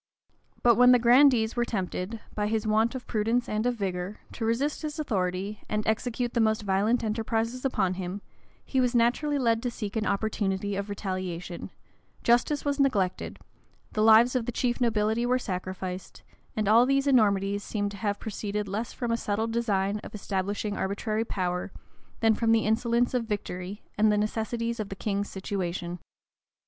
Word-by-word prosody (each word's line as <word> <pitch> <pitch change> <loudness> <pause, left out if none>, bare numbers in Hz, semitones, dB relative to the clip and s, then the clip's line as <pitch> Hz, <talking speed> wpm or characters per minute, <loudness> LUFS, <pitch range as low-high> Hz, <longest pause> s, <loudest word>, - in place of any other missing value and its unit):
But 235 -2 +5
when 250 +1 +8
the - - +7
grandees 245 -1 +5
were 240 - +2
tempted, 205 0 -3
by 210 -1 -1
his 220 +1 -1
want 220 +3 +2
of 255 - -6
prudence 230 +3 0
and 215 +3 0
of 245 - +1
vigor, 190 -1 -3
to - - -6
resist 260 +6 0
his 305 -1 -4
authority, 195 - -2
and 210 0 -1
execute 240 +2 -1
the - - +1
most 220 -1 +2
violent 205 +5 +1
enterprises 225 +2 -1
upon 200 -8 +1
him, 185 +2 -5 0.4
he 265 - +1
was 250 -1 +1
naturally 250 +5 +2
led 230 -4 +2
to 245 - -1
seek 215 -3 -6
an 220 -1 0
opportunity 200 -1 -1
of 200 +1 -3
retaliation: 185 -3 -4 0.5
justice 245 +5 +2
was 285 0 0
neglected; 205 -10 0 0.5
the 215 - -1
lives 225 +3 +6
of 240 -3 0
the - - 0
chief 240 +1 -1
nobility 220 -1 +1
were 250 +1 +2
sacrificed; 185 -3 -5 0.3
and 215 -2 0
all 230 +4 +6
these 275 0 +2
enormities 205 -6 +3
seem 205 -2 -2
to 200 - -9
have 205 0 -1
proceeded 210 -1 -3
less 215 +4 -3
from 240 -2 -3
a 230 - +2
settled 220 +1 -1
design 210 -3 0
of - - -10
establishing 200 +1 -2
arbitrary 215 +3 -1
power, 180 -2 -2 0.5
than 225 -1 +5
from 225 +1 +1
the 225 - +3
insolence 235 +3 +1
of 245 -2 0
victory, 200 -2 -5 0.2
and 215 0 +5
the 210 - +2
necessities 230 +2 -2
of 210 -2 -3
the 195 - -5
king's 200 0 -2
situation. 180 -2 -4
220 Hz, 175 wpm, -27 LUFS, 200-235 Hz, 0.5 s, when